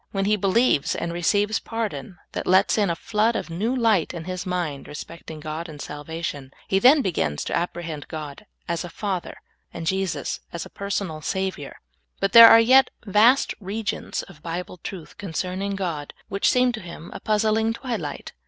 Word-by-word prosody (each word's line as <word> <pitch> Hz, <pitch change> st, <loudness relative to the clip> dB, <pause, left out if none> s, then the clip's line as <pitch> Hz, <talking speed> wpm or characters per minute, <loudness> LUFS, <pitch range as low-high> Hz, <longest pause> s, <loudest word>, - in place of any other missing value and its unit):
When 195 Hz, -1 st, -1 dB
he 210 Hz, +1 st, +3 dB
believes 200 Hz, -, +2 dB
and 170 Hz, 0 st, -3 dB
receives 205 Hz, +5 st, +1 dB
pardon 200 Hz, -, -4 dB
that -, -, -4 dB
lets 190 Hz, +2 st, +4 dB
in 205 Hz, -3 st, +2 dB
a 170 Hz, -, 0 dB
flood 220 Hz, +6 st, +1 dB
of 170 Hz, -, -3 dB
new 215 Hz, +10 st, -1 dB
light 220 Hz, -9 st, +2 dB
in 165 Hz, -, -5 dB
his 185 Hz, +1 st, -5 dB
mind 175 Hz, -6 st, -3 dB
respecting 160 Hz, +1 st, -9 dB
God 155 Hz, +2 st, -5 dB
and 150 Hz, -2 st, -10 dB
sal 145 Hz, +1 st, -7 dB
vation, 155 Hz, -4 st, -5 dB, 0.2 s
he 195 Hz, -, +2 dB
then 270 Hz, +6 st, +6 dB
begins 80 Hz, -, -1 dB
to -, -, -2 dB
apprehend 170 Hz, -3 st, -3 dB
God 155 Hz, +5 st, -7 dB, 0.2 s
as 170 Hz, 0 st, -2 dB
a 175 Hz, -, -7 dB
Father 190 Hz, -2 st, -4 dB, 0.3 s
and 165 Hz, -, -6 dB
Jesus 190 Hz, +1 st, -1 dB
as 170 Hz, -, -5 dB
a -, -, -13 dB
pensonal 200 Hz, -5 st, -3 dB
Savior. 190 Hz, -7 st, -3 dB, 0.4 s
But 195 Hz, -, +1 dB
there 230 Hz, +1 st, +12 dB
are 230 Hz, 0 st, +8 dB
3 245 Hz, +3 st, +3 dB
et 265 Hz, -1 st, +7 dB, 0.2 s
vast 225 Hz, +6 st, +4 dB
regions 205 Hz, +2 st, -3 dB
of 170 Hz, -6 st, -15 dB
Bible 175 Hz, +2 st, -5 dB
truth 180 Hz, +3 st, -9 dB
con 195 Hz, -6 st, -6 dB
cerning 190 Hz, +3 st, -2 dB
God 165 Hz, -7 st, -4 dB
which 200 Hz, -, +2 dB
seem 250 Hz, 0 st, +3 dB
to 220 Hz, -, -6 dB
him 170 Hz, -1 st, -10 dB
a -, -, -7 dB
puzzling 220 Hz, +1 st, +1 dB
twilight. 240 Hz, 0 st, -5 dB
185 Hz, 185 wpm, -24 LUFS, 165-215 Hz, 0.4 s, there